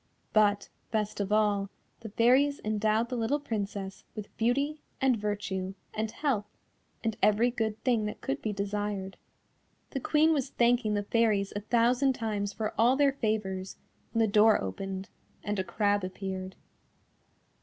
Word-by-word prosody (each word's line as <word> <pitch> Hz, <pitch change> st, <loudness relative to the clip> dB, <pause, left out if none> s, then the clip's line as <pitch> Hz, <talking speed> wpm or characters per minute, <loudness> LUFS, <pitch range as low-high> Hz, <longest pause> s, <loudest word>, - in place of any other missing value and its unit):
But, 205 Hz, -1 st, +3 dB, 0.2 s
best 210 Hz, -2 st, -2 dB
of 200 Hz, 0 st, -2 dB
all, 205 Hz, -2 st, +2 dB, 0.3 s
the 225 Hz, -, -8 dB
Fairies 260 Hz, +7 st, +3 dB
endowed 215 Hz, +2 st, +1 dB
the 255 Hz, -, -2 dB
little 240 Hz, +5 st, 0 dB
Princess 200 Hz, -6 st, -4 dB
with 210 Hz, -1 st, -8 dB
beauty, 280 Hz, +6 st, 0 dB, 0.2 s
and 265 Hz, -2 st, +3 dB
virtue, 200 Hz, -3 st, -3 dB, 0.2 s
and 220 Hz, 0 st, -2 dB
health, 225 Hz, -5 st, -1 dB, 0.6 s
and 225 Hz, -2 st, -1 dB
every 220 Hz, +4 st, +4 dB
good 220 Hz, -3 st, -2 dB
thing 235 Hz, -4 st, +2 dB
that 210 Hz, -, -6 dB
could 270 Hz, +1 st, -3 dB
be 215 Hz, -, -1 dB
desired. 200 Hz, -1 st, -3 dB, 0.8 s
The 270 Hz, -, -2 dB
Queen 310 Hz, +4 st, +3 dB
was 280 Hz, -4 st, -1 dB
thanking 235 Hz, -3 st, +2 dB
the 205 Hz, -, 0 dB
Fairies 210 Hz, -2 st, +1 dB
a -, -, 0 dB
thousand 245 Hz, +5 st, +3 dB
times 210 Hz, -4 st, -2 dB
for 215 Hz, +1 st, -3 dB
all 240 Hz, +3 st, +5 dB
their 280 Hz, -1 st, +3 dB
favours, 205 Hz, -6 st, -2 dB, 0.3 s
when 225 Hz, 0 st, +1 dB
the 200 Hz, -, -4 dB
door 215 Hz, 0 st, +6 dB
opened, 190 Hz, -, -5 dB, 0.3 s
and 205 Hz, 0 st, -2 dB
a -, -, +1 dB
crab 205 Hz, +2 st, +1 dB
appeared. 185 Hz, 0 st, -5 dB
215 Hz, 155 wpm, -29 LUFS, 200-240 Hz, 0.8 s, door